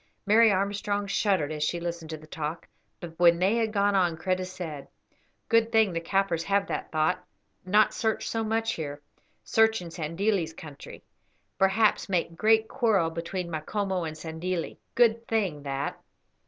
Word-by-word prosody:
Mary 220 +2 +6
Armstrong 200 +1 -1
shuddered 195 -6 +1
as 155 -1 -4
she 170 +3 0
listened 170 -2 -5
to 160 - -5
the 155 - -14
talk, 155 +1 -5 0.3
but 170 -2 -8
when 170 -1 +6
they 190 +6 +2
had 225 -2 0
gone 205 -1 +2
on 175 -4 +2
Kreta 185 +2 -1
said: 165 -6 -7 0.6
"Good 230 -1 +3
thing 220 -5 +3
the 165 - -2
Kaffirs 175 -1 0
have 200 +1 +2
that - - -4
thought, 155 +3 +1 0.4
not 210 +3 +4
search 220 -1 -1
so 225 0 -1
much 225 +1 0
here. 145 -2 -6 0.4
Search 225 0 +3
in 175 -2 -8
Sandilli's 165 +2 -1
country. 150 -3 -11 0.6
Perhaps 200 +2 +3
make 170 -3 -1
great 220 +4 +3
quarrel 215 -11 +1
between 170 +2 -4
Macomo 185 +4 -2
and 155 -1 -5
Sandilli. 165 +2 -4 0.2
Good 230 -1 +3
thing 195 -10 0
that." 140 0 -4
185 Hz, 160 wpm, -27 LUFS, 165-215 Hz, 0.6 s, Mary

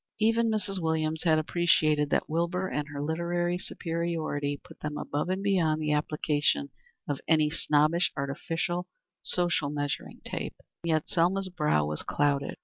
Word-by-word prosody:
Even 225 +1 +3
Mrs. 205 -3 0
Williams 160 -1 0
had 160 -2 +5
appreciated 155 -2 +3
that - - +1
Wilbur 170 +4 0
and 150 -4 -2
her 145 -1 -5
literary 175 +3 0
superiority 165 -5 -2
put 170 -2 -15
them 150 0 -4
above 150 +5 -2
and 190 +1 -1
beyond 170 -6 +2
the 150 -1 0
application 150 - +1 0.4
of 145 -2 -2
any 155 -2 +4
snobbish, 155 +2 +2
artificial, 165 +5 -2 0.3
social 175 -5 +1
measuring 145 -1 -3
tape. - - -4 0.3
And 170 - -2
yet 155 -1 +1
Selma's 185 +3 +1
brow 150 - +1
was 75 +1 -3
clouded. 140 -1 0
160 Hz, 145 wpm, -29 LUFS, 150-175 Hz, 0.4 s, had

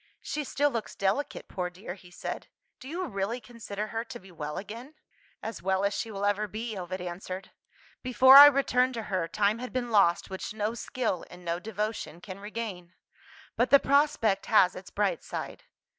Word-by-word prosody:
"She 300 - -3
still 290 +1 +1
looks 230 -4 -4
delicate, 200 +9 -1
poor 180 -1 -3
dear," 180 +1 -8
he 180 -2 -15
said. 175 - -6 0.3
"Do 260 - -11
you 350 +5 -3
really 210 - -2
consider 215 -3 -6
her 225 0 -2
to - - -8
be 190 0 -15
well 150 -3 -5
again?" 235 +9 -8 0.5
"As 225 - -5
well 190 +2 +1
as 200 - +1
she 225 - -3
will 200 -1 -3
ever 205 +1 +1
be," 220 +2 -5
Ovid 185 0 -5
answered. 185 +2 -6 0.5
"Before 260 +1 +7
I 290 +1 +13
returned 260 -2 +2
to 225 - -3
her, 180 -3 +1
time 210 +5 +1
had 250 +1 -6
been 245 -2 -2
lost 190 -4 +3
which 190 +2 -5
no 215 +1 -1
skill 235 -6 -2
and 180 0 -13
no 170 0 -1
devotion 210 -4 -4
can 185 +1 -9
regain. 200 -4 -6 0.6
But 240 +1 +2
the 280 - +9
prospect 275 -9 +2
has 190 -4 +5
its 185 +1 -9
bright 195 -5 0
side. - - -6
210 Hz, 190 wpm, -29 LUFS, 185-240 Hz, 0.6 s, I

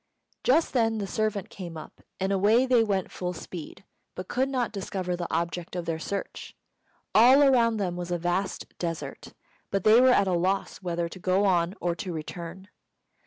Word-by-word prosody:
Just 310 +6 +3
then 225 -3 +2
the 205 - -2
servant 210 0 -2
came 170 -4 -7
up, 155 - -11 0.2
and 190 +1 0
away 210 +6 +4
they 250 -3 +4
went 195 -4 -1
full 180 0 -4
speed, 175 +2 -9 0.3
but 185 - -6
could 260 +2 0
not 255 -3 -1
discover 190 -3 -3
the 175 -1 -5
object 170 +1 -2
of 175 -1 -3
their 165 -1 -2
search. 200 +4 -5 0.6
All 255 +6 +7
around 235 -5 +4
them 185 -4 -2
was 175 0 -5
a 175 - 0
vast 175 +3 -2
desert, 165 -2 -5 0.4
and 195 -2 0
they 220 +3 +7
were 260 - +6
at 205 -5 +4
a 185 - +1
loss 185 +3 0
whether 170 -2 -2
to 185 - -10
go 185 +3 +2
on 180 -1 +2
or 175 -1 0
to 185 - -4
return. 170 +3 -7
190 Hz, 185 wpm, -27 LUFS, 175-220 Hz, 0.6 s, All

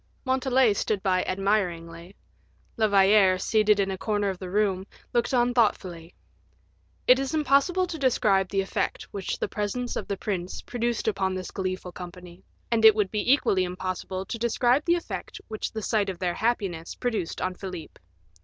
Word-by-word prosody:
Montalais 260 -3 +3
stood 200 -1 -1
by 185 -1 +2
admiringly; 180 -3 -2 0.6
La 220 -1 +2
Valliere, 195 -1 +5
seated 210 +2 +2
in 195 -1 +1
a 190 - -5
corner 205 -2 0
of 185 - -9
the 185 - -6
room, 195 -1 0 0.3
looked 240 -1 +1
on 245 -1 +2
thoughtfully. 180 -7 0 0.9
It 255 +1 +6
is 270 +3 -2
impossible 310 +5 +3
to 340 -3 -6
describe 200 -8 +2
the 195 - +1
effect 190 - -2
which 195 -2 -4
the - - -2
presence 225 +4 -3
of - - -4
the 200 - -3
prince 185 -3 -4
produced 240 -2 -2
upon 195 -3 0
this 185 -1 -5
gleeful 185 -1 -4
company, 180 0 -10 0.3
and 225 -1 +2
it 220 -1 +9
would 210 -3 0
be 210 +3 +1
equally 195 -9 +3
impossible 185 +1 -4
to 230 - -5
describe 240 +4 +2
the 345 - +4
effect 345 - -6
which 215 -1 -4
the 220 -1 -5
sight 205 -2 +1
of 185 - -4
their 175 -1 -1
happiness 195 -7 -2
produced 225 -9 -2
upon 185 - -1
Philip. 180 -3 -8
200 Hz, 170 wpm, -26 LUFS, 185-235 Hz, 0.9 s, it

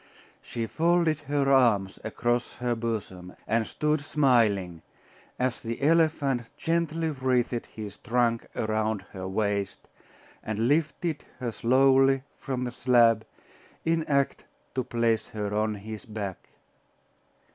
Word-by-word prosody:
She 115 -1 -4
folded 165 +3 +2
her 140 -1 +1
arms 110 -7 +3
across 120 +2 -1
her 120 0 -1
bosom, 105 -6 -4
and 110 0 +1
stood 150 0 0
smiling, 110 - +2 0.6
as 125 -1 -1
the 115 0 -4
elephant 150 -6 +2
gently 165 -1 0
wreathed 125 -3 0
his 105 -2 -8
trunk 120 -1 0
around 110 -2 -1
her 95 -1 -6
waist, 100 0 -2 0.5
and 110 +2 -1
lifted 155 +2 0
her 125 -2 -3
slowly 135 +3 +4 0.2
from 130 -2 -3
the 125 - -3
slab, 115 -3 +3 0.6
in 165 0 +2
act 140 -2 +1 0.3
to 130 - -1
place 115 -2 0
her 105 -1 -4
on 105 0 0
his 110 +1 -8
back.... 105 -4 -6
120 Hz, 120 wpm, -27 LUFS, 110-140 Hz, 0.6 s, slowly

